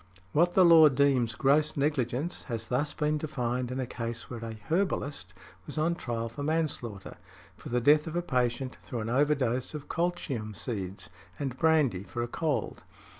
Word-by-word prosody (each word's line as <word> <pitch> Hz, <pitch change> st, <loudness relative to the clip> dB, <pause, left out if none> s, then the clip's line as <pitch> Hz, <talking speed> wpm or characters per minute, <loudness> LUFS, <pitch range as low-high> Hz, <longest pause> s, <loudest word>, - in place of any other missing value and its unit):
What 175 Hz, -, +3 dB
the 185 Hz, -, +6 dB
law 165 Hz, -2 st, +8 dB
deems 130 Hz, -4 st, +2 dB
gross 150 Hz, +3 st, +2 dB
negligence 140 Hz, +2 st, -1 dB
has 115 Hz, -4 st, -4 dB
been 125 Hz, -, 0 dB
thus 145 Hz, +3 st, 0 dB, 0.3 s
defined 125 Hz, -5 st, -2 dB
in 130 Hz, +1 st, -3 dB
a 130 Hz, -, -1 dB
case 120 Hz, 0 st, -6 dB
where 115 Hz, -2 st, -6 dB
a 115 Hz, -1 st, -5 dB
"Herbalist" 145 Hz, -, -2 dB, 0.3 s
was -, -, -7 dB
on 160 Hz, +3 st, +2 dB
trial 115 Hz, -7 st, -3 dB
for 115 Hz, +5 st, -8 dB
manslaughter, 145 Hz, -10 st, -2 dB, 0.4 s
for -, -, -10 dB
the 125 Hz, 0 st, +1 dB
death 150 Hz, +5 st, +5 dB
of 160 Hz, -, -5 dB
a 175 Hz, -, 0 dB
patient 125 Hz, -2 st, -1 dB
through 120 Hz, -, -5 dB
an 110 Hz, -, -4 dB
overdose 130 Hz, 0 st, +1 dB
of 150 Hz, -1 st, -7 dB
colchium 150 Hz, -11 st, -2 dB
seeds 95 Hz, -4 st, -5 dB, 0.3 s
and 135 Hz, -3 st, -3 dB
brandy 145 Hz, -, +3 dB
for 120 Hz, +3 st, -4 dB
a -, -, -2 dB
cold. 150 Hz, +4 st, -2 dB
130 Hz, 175 wpm, -29 LUFS, 120-155 Hz, 0.4 s, law